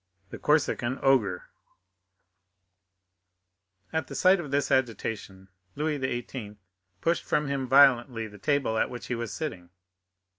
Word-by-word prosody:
The - - -8
Corsican 135 -4 +1
Ogre 110 -10 +2 2.5
At 160 0 -1
the - - -8
sight 185 +1 +4
of 155 -5 -6
this 140 +1 0
agitation 110 -6 -2 0.3
Louis 150 0 -1
XVIII. 120 -4 -4 0.5
pushed 170 +1 +1
from 150 - 0
him 135 -2 -2
violently 125 -3 +5
the 105 -1 -12
table 135 -2 +1
at - - +1
which 120 -1 -7
he 125 - -2
was 115 -1 -4
sitting. 95 - -5
130 Hz, 125 wpm, -27 LUFS, 115-145 Hz, 2.5 s, violently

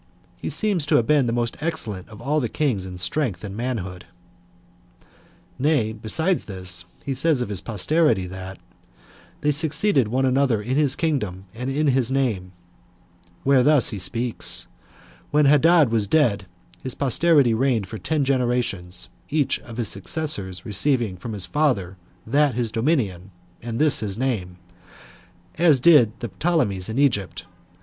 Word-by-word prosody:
He - - -5
seemed 205 -5 0
to - - +3
have 115 - +3
been 145 -2 +3
the - - 0
most 120 0 -1
excellent 115 - -4
of 110 -1 -12
all 145 +6 0
their 120 -6 -2
kings 115 -11 -1
in 90 -1 -8
strength 90 - -1
and 100 -1 -6
manhood," 105 -7 -4 1.5
Nay, 130 -6 +1
besides 160 - -1
this, 90 -3 -3 0.2
he 140 - -1
says 140 +2 +2
of 125 - -3
his 100 -3 -3
posterity, 115 - +1
that 95 0 -8 0.8
"they 150 0 +2
succeeded 150 - +2
one 130 +4 0
another 130 -3 +2
in 120 +5 -3
his 145 -2 +3
kingdom, 105 - -2
and 125 +3 -5
in 145 +2 +1
his 130 -2 +1
name;" 115 -10 -1 0.9
where 135 -1 +4
he - - +4
thus 145 -3 +4 0.2
speaks: 120 +2 -1 0.6
"When 150 0 +3
Hadad 150 -1 +5
was 110 -3 +1
dead, 105 -9 +2 0.3
his 130 - -5
posterity 140 -2 +3
reigned 120 -3 +1
for 110 +3 -8
ten 150 -3 -1
generations, 120 -9 0 0.2
each 145 -1 +1
of 115 -1 -11
his 115 -4 -1
successors 100 - -2
receiving 115 -1 0
from 110 +5 -7
his 100 -3 -1
father 100 -7 0 0.3
that 145 +3 +2
his 120 -3 -1
dominion, 110 - -1 0.3
and 115 0 -5
this 150 +1 +2
his 100 -2 -4
name; 110 -9 -2 1.0
as 160 -6 +5
did 125 -7 +5
the 120 - -4
Ptolemies 125 - 0
in 110 - -4
Egypt. 120 -9 0
125 Hz, 155 wpm, -23 LUFS, 100-145 Hz, 1.5 s, Hadad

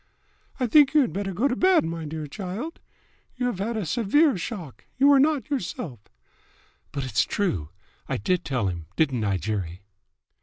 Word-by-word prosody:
"I 255 - +2
think 285 +4 +5
you 300 - +7
had 245 - 0
better 195 +1 -2
go 215 +10 +1
to 250 - 0
bed, 370 - +4
my 165 -1 -4
dear 155 0 -5
child. 200 - -6 0.6
You 250 - -2
have 245 -7 -1
had 225 +3 -2
a 210 - -2
severe 245 - +3
shock. 170 - -6
You 280 +2 +6
are 275 - +6
not 290 -3 +2
yourself." 175 - -3 0.9
"But 140 - -3
it's 125 -5 +1
true! 95 - -1 0.4
I - - 0
did 180 - 0
tell 125 -6 -1
him, 85 -3 -4
didn't 135 -8 +1
I, 100 -2 +1
Jerry?" 95 -1 -4
185 Hz, 180 wpm, -25 LUFS, -, 0.9 s, you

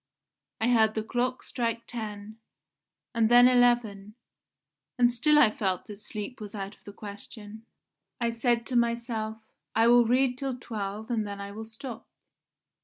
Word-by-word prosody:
I 225 - +1
heard 220 -3 +4
the 220 - -1
clock 250 +3 -2
strike 230 -1 -3
ten, 215 -1 -7 0.7
and 225 -1 +2
then 245 +1 +8
eleven, 240 -5 +2 0.8
and 240 -1 +4
still 300 +5 +3
I 270 -8 +6
felt 190 -4 -2
that 205 -1 -10
sleep 215 +2 -7
was 210 0 -8
out 195 0 -5
of - - -31
the 205 - -8
question. 210 +2 -10 0.5
I 235 -1 0
said 235 0 0
to 255 - -3
myself: 235 -2 0 0.4
'I 225 +1 +4
will 240 0 +6
read 250 +1 +2
till 270 -2 -3
twelve 215 -1 -5
and 220 -3 0
then 200 0 -6
I 200 0 -6
will 220 +2 -7
stop. 225 +1 -9
225 Hz, 160 wpm, -28 LUFS, 210-245 Hz, 0.8 s, then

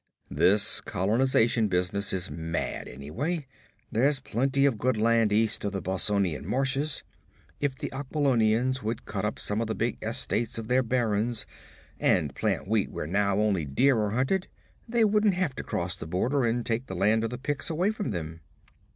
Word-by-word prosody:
This 100 +2 +4
colonization 115 +2 +2
business 95 +2 -1
is 90 -1 -2
mad, 80 0 -3
anyway. 130 - -4 0.5
There's 135 +5 +2
plenty 135 +2 0
of 125 -7 +1
good 125 0 +1
land 115 0 +3
east 110 +1 +2
of 100 -1 -2
the 95 - -3
Bossonian 95 -3 +1
marches. 135 - 0 0.6
If 140 -2 -1
the - - -5
Aquilonians 130 -3 +1
would 110 0 -4
cut 105 -1 -3
up 105 - -2
some 105 +2 0
of 115 - -2
the 110 - -2
big 120 +2 -2
estates 115 +1 -1
of 115 0 -6
their 125 +1 +4
barons, 115 -2 0 0.5
and 75 -6 +2
plant 70 - -1
wheat 110 -1 +1
where - - -5
now 100 +4 +1
only 105 -5 +1
deer 125 - +2
are 105 -1 0
hunted, 135 - 0 0.4
they 235 -1 +3
wouldn't 210 -2 +3
have 180 -7 0
to - - -4
cross 90 +2 -1
the 95 - -7
border 120 - 0
and 115 +1 0
take 120 +2 -2
the 95 - -6
land 105 +5 +2
of 115 - -1
the 125 - -5
Picts 145 +5 -2
away 175 +6 +1
from 215 -2 -4
them.' 80 -3 -5
115 Hz, 175 wpm, -27 LUFS, 100-130 Hz, 0.6 s, This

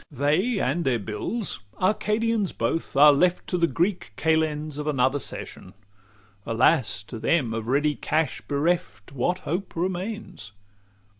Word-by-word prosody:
XLV 140 - -14
They 175 - +1
and 150 +7 0
their 130 -4 +2
bills, 115 - -3 0.2
"Arcadians 210 +1 +1
both," 115 +8 -2
are 145 +1 +8
left 180 +5 +2
To 180 - -1
the 170 - +4
Greek 175 +3 -1
kalends 155 -2 0
of 150 - -4
another 135 -1 +2
session. 95 -7 -5 0.7
Alas! 115 - +2
to 115 +2 -8
them 125 -4 +1
of 115 0 -4
ready 145 +4 +2
cash 155 +1 -1
bereft, 145 - -1
What 140 +7 0
hope 180 +5 -3
remains? 185 - -4
155 Hz, 140 wpm, -25 LUFS, 130-180 Hz, 0.7 s, are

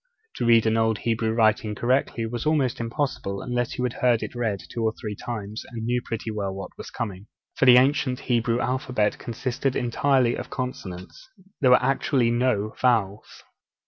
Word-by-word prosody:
To - - -1
read 115 -1 +5
an 110 0 +2
old 110 -1 +2
Hebrew 115 -1 +1
writing 110 -1 +2
correctly 120 0 0
was 120 +1 -4
almost 140 -6 +1
impossible, 115 -5 -2
unless 120 -1 -2
you 125 - -1
had 125 -1 -1
heard 120 -2 +3
it - - -6
read 110 -7 -2
two 115 +6 -4
or 110 -1 +1
three 105 -2 -5
times, 105 -1 -6
and 115 -2 -6
knew 120 +1 0
pretty 115 0 -4
well 100 -2 -3
what 95 - -8
was - - -9
coming. 100 -2 -5 0.3
For - - +2
the 125 -1 +9
ancient 130 -1 +2
Hebrew 120 -1 +1
alphabet 125 -4 0
consisted 130 +2 -2
entirely 125 0 +2
of - - -6
consonants; 95 - -6 0.3
there 130 - +4
were 125 0 +6
actually 130 -2 +2
no 120 -3 0
vowels! 110 -5 0
120 Hz, 175 wpm, -25 LUFS, 110-125 Hz, 0.3 s, the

